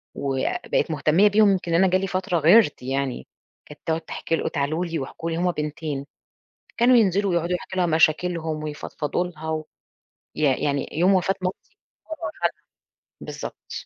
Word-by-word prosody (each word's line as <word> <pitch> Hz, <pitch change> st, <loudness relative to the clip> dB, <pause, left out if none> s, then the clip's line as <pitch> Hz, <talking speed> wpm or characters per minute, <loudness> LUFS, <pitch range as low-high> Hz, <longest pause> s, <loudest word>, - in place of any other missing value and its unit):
وبقت 135 Hz, +3 st, -1 dB
مهتمية 160 Hz, +6 st, +4 dB
بيهم 205 Hz, 0 st, +5 dB
يمكن 175 Hz, -3 st, -1 dB
أنا 185 Hz, +3 st, +5 dB
جالي 185 Hz, +1 st, +1 dB
فترة 185 Hz, 0 st, -1 dB
غِيرت 170 Hz, +2 st, +5 dB
يعني، 135 Hz, -, -3 dB, 0.4 s
كانت 150 Hz, -, -13 dB
تقعُد 160 Hz, 0 st, 0 dB
تحكي 165 Hz, 0 st, -3 dB
ل -, -, -3 dB
وتعالوا 155 Hz, +4 st, -1 dB
لي 165 Hz, -2 st, -3 dB
واحكوا 155 Hz, +4 st, -5 dB
لي، 165 Hz, -, -2 dB
هُم 180 Hz, +1 st, +1 dB
بنتين 150 Hz, -2 st, -4 dB, 0.7 s
كانوا 245 Hz, +2 st, +5 dB
ينزِلوا 200 Hz, -3 st, +2 dB
يقعُدوا 170 Hz, +1 st, 0 dB
يحكوا 190 Hz, +1 st, -7 dB
لها 180 Hz, -, +3 dB
مشاكلهم 160 Hz, -1 st, +1 dB
ويفضفضوا 150 Hz, +2 st, -3 dB
لها 160 Hz, -2 st, -8 dB
و 155 Hz, -1 st, -2 dB, 0.7 s
يع 140 Hz, -4 st, +2 dB
يعني 140 Hz, -1 st, -1 dB
يوم 180 Hz, +5 st, +3 dB
وفاة 190 Hz, +1 st, +2 dB
مامتي 185 Hz, -, -5 dB, 0.3 s
هُم -, -, -16 dB
راحوا -, -, -2 dB
لها 170 Hz, -, +3 dB, 0.7 s
بالضبط -, -, -8 dB
165 Hz, 160 wpm, -24 LUFS, 150-185 Hz, 0.7 s, بيهم